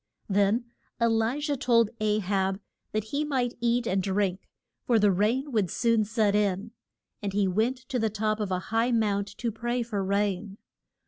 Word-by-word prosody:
Then 205 +4 +2 0.3
E 235 - +3
li 225 +4 +1
jah 290 -1 0
told 230 -4 +3
A 215 -1 +2
hab 190 0 0 0.3
that 215 0 -1
he 280 +8 -2
might 260 -5 0
eat 240 0 +1
and 195 -3 +1
drink, 190 -1 -1 0.3
for 235 - +3
the 205 -2 +4
rain 230 +9 +1
would 210 -7 +1
soon 230 +1 +2
set 215 -1 +1
in. 205 +1 0 0.5
And 200 -2 -3
he 200 -1 +2
went 220 +8 +1
to 250 - 0
the 220 -1 +1
top 215 +1 -1
of 210 -2 -2
a 185 - 0 0.2
high 230 +2 +3
mount 205 -3 +1
to 235 -2 -2
pray 240 +2 -2
for 210 -4 -3
rain. 200 0 -1
215 Hz, 185 wpm, -27 LUFS, 200-235 Hz, 0.5 s, the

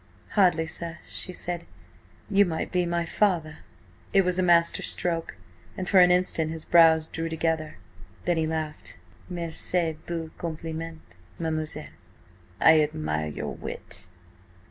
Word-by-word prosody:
"Hardly, 175 -5 +3
sir," 165 +1 -3
she 185 - -5
said. 175 -1 -4 0.6
"You 205 -1 +5
might 165 -4 -3
be 180 -1 +1
my 170 0 -1
father." 165 -5 0 0.5
It 195 -1 +5
was 180 0 +1
a - - +4
master 170 -2 +4
stroke, 165 -2 +1 0.4
and 185 - -4
for 195 - +5
an 180 0 +7
instant 180 -3 +2
his 160 -1 -5
brows 160 -2 +6
drew 165 +1 -4
together. 160 -1 -1 0.5
Then 175 -1 +1
he 160 -1 +1
laughed. 155 -1 -4 0.3
"Merci 170 -1 -1
du 165 -2 -4
compliment, 165 0 -5 0.3
mademoiselle! 155 -2 -3 0.7
I 160 -1 +7
admire 75 - -2
your 75 - -5
wit." - - -5
165 Hz, 135 wpm, -26 LUFS, 160-175 Hz, 0.7 s, an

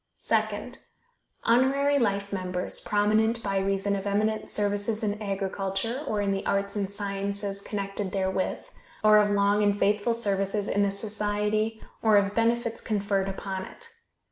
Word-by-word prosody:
Second - - -1 0.6
Honorary 275 +4 +3
life 200 -3 0
members, 180 -1 0
prominent 220 +3 +2
by 195 -1 0
reason 195 +1 0
of 195 0 -4
eminent 215 +2 0
services 205 +2 0
in 210 0 -1
agriculture, 195 +5 -2
or 210 -4 0
in 200 -1 0
the 195 0 -1
arts 200 +1 -1
and 200 -2 -1
sciences 200 0 -2
connected 200 -1 -3
therewith, 190 -1 -1 0.4
or 215 0 +7
of 210 0 +3
long 205 +1 +3
and 205 -1 +2
faithful 210 +3 +2
services 200 -2 0
in 205 - +1
the 200 - +3
society, 210 +1 -1 0.2
or 220 -2 +5
of 200 0 +2
benefits 230 0 0
conferred 200 -2 0
upon 190 0 -4
it. 470 - -5
205 Hz, 145 wpm, -27 LUFS, 195-215 Hz, 0.6 s, or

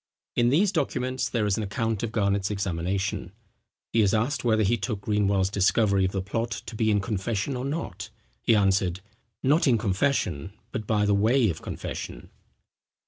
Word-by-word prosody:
In 120 0 +3
these 180 +9 +3
documents 130 -6 -1
there 115 -3 0
is 100 -2 +1
an 110 - -1
account 110 +1 -2
of 115 -2 -2
Garnet's 100 -3 +1
examination. 95 0 -2 0.6
He 115 - +4
is 105 +1 +3
asked 120 +4 0
whether 110 -2 +3
he 105 +4 +3
took 100 -1 -3
Greenwell's 100 -2 +1
discovery 100 0 +3
of 95 - -1
the 95 -1 -2
plot 115 +4 -2 0.2
to 115 - -8
be 110 0 +1
in 105 -1 +3
confession 105 +4 -2
or 125 +1 -3
not? 115 - -4 0.3
he 115 - +4
answered, 95 -3 +2 0.4
"Not 150 +4 +3
in 120 -3 +4
confession, 95 - 0 0.2
but 105 - -4
by 105 -2 +2
way 110 +3 +3
of 80 - -8
confession." - - -6
105 Hz, 170 wpm, -26 LUFS, 95-115 Hz, 0.6 s, He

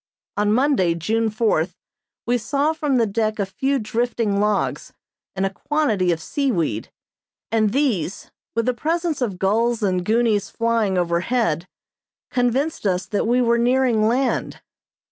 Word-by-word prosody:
On 210 0 +1
Monday, 235 - +2
June 220 +7 0
fourth, 215 -6 0 0.5
we 245 +1 +1
saw 280 +6 0
from 300 -4 -1
the 230 - +3
deck 215 +1 -1
a 200 - 0
few 270 +8 -1
drifting 230 -2 -1
logs 210 0 0 0.4
and 190 0 0
a 195 - -1
quantity 220 -11 0
of 165 - -1
seaweed, 170 - -1 0.6
and 215 -2 +2
these, 225 - -1 0.2
with 230 0 +1
the 250 - +1
presence 325 +4 -1
of 210 -7 -1
gulls 225 +4 +1
and 185 -3 +1
goonies 215 -1 +1
flying 230 -4 0
overhead, 175 0 0 0.6
convinced 255 +1 0
us 180 -1 0
that 210 +1 -1
we 245 +2 +3
were 235 0 +2
nearing 240 -3 +3
land. 255 +4 0
225 Hz, 145 wpm, -22 LUFS, 195-250 Hz, 0.6 s, the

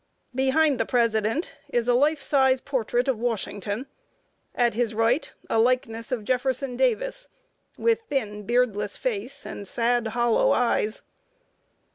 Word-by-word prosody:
Behind 265 +2 +2
the - - +1
president 230 - +1 0.2
is 240 -1 0
a 245 - +4
life 290 +3 +2
size 265 -2 +3
portrait 245 -2 -1
of 260 -5 0
Washington; 220 -1 -3 0.7
at 240 -1 +2
his 230 -1 -1
right, 230 +6 +1 0.2
a 225 - +1
likeness 230 -1 0
of 240 -4 -1
Jefferson 255 +1 0
Davis, - - 0 0.5
with 460 0 +2
thin, 210 -7 -2
beardless 220 -4 +1
face, 240 0 -4
and 200 - -7
sad, 235 +2 +1
hollow 235 +1 +2
eyes. 230 -3 0
245 Hz, 130 wpm, -25 LUFS, 225-265 Hz, 0.7 s, a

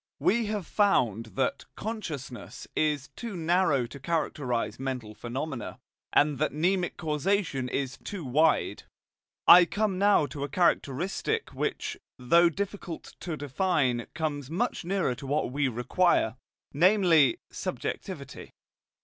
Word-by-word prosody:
We 230 +1 +2
have 210 -3 -2
found 120 - +2
that 130 -1 0
"consciousness" 160 - -6
is 150 -2 0
too 230 -6 -6
narrow 165 -6 +2
to 140 +4 -10
characterize 130 -8 -2
mental 130 -5 -4
phenomena, 130 +3 -5 0.3
and 145 -2 +3
that - - +1
mnemic 175 +4 0
causation 155 -4 0
is 130 -1 -3
too 190 -7 -6
wide. 155 +5 +2 0.6
I 175 0 +10
come 205 0 -1
now 200 -6 +4
to 140 +1 -6
a 145 - -3
characteristic 180 - 0
which, - - -3 0.2
though 170 +8 +5
difficult 190 -1 -5
to 165 -4 -4
define, 140 -4 0
comes 145 -4 -3
much 200 +8 -1
nearer 180 -6 0
to 135 +3 -9
what 140 -2 0
we 140 +1 +1
require, 125 +1 +2 0.4
namely 170 -3 +5
subjectivity. - - -5
155 Hz, 125 wpm, -28 LUFS, 130-185 Hz, 0.6 s, I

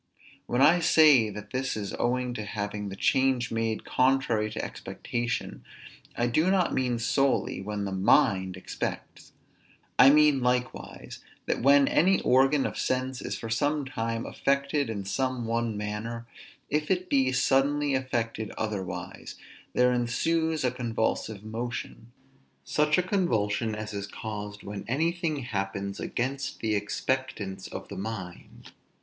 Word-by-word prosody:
When 120 - +1
I 165 +5 +6
say 150 -9 +6
that 105 0 -9
this 130 -2 -2
is 100 -2 -4
owing 125 0 0
to 110 - -4
having 105 -1 -4
the 95 - -6
change 130 +2 +2
made 115 -1 -1
contrary 125 -5 +2
to 110 - -4
expectation; 120 -1 -4 0.5
I 120 - +2
do 155 +9 +2
not 190 -2 +2
mean 125 -2 0
solely, 135 -1 +1
when 105 0 -3
the 100 - -3
mind 95 -1 +3
expects. 95 - -6 0.7
I 135 - +10
mean 150 -2 +5
likewise, 125 0 -2 0.3
that - - -1
when 140 +2 +6
any 190 +4 +4
organ 135 +2 +4
of - - -3
sense 130 0 -1
is - - -4
for 115 - -6
some 145 +5 +1
time 115 -3 -3
affected 140 -1 0
in 100 -3 -4
some 130 +3 -1
one 115 -1 -1
manner, 105 +3 -4 0.4
if 150 +1 -1
it 185 -1 0
be 135 -4 +2
suddenly 140 +3 +2
affected 115 -5 -2
otherwise, 105 -4 -5 0.4
there 125 0 +4
ensues 160 +7 0
a 125 - +2
convulsive 115 -4 -2
motion; 115 +1 -6 0.5
such 150 0 +2
a 180 - +3
convulsion 115 - 0
as 105 0 -6
is 100 0 -4
caused 105 -1 -6
when 100 0 -6
anything 160 +2 0
happens 100 -4 -3
against 135 +3 -3
the 110 -1 0
expectance 105 -2 -2
of - - -7
the - - -7
mind. 95 -4 -7
120 Hz, 140 wpm, -28 LUFS, 105-135 Hz, 0.7 s, I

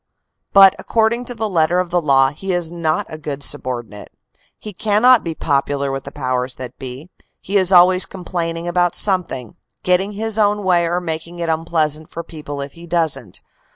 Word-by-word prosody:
But 195 -1 +7
according 230 +2 0
to 245 - -6
the 220 -1 -2
letter 170 -2 +1
of 180 -1 -2
the 175 0 +2
law, 135 -3 +4
he 185 +6 -4
is 175 -2 -1
not 165 -2 -1
a 155 - -9
good 145 -2 -5
subordinate. 120 -6 -3 0.5
He 210 - -9
cannot 220 +5 +4
be 165 -1 -4
popular 140 -1 -1
with 135 0 -5
the 140 - -8
powers 130 -2 -2
that 125 -2 -9
be; 135 +6 -9 0.3
he 200 - -5
is 190 -2 +4
always 185 0 +5
complaining 170 -2 -4
about 175 0 +1
something; 180 - 0 0.3
getting 185 +3 +1
his 220 +1 -1
own 205 0 +2
way 175 -2 +2
or 175 +1 0
making 170 0 -5
it 170 -1 -3
unpleasant 160 -1 -1
for 170 - -6
people 150 -3 -7
if 140 0 -6
he 170 0 -13
doesn 160 - -1
t. - - -8
170 Hz, 190 wpm, -19 LUFS, 145-185 Hz, 0.5 s, But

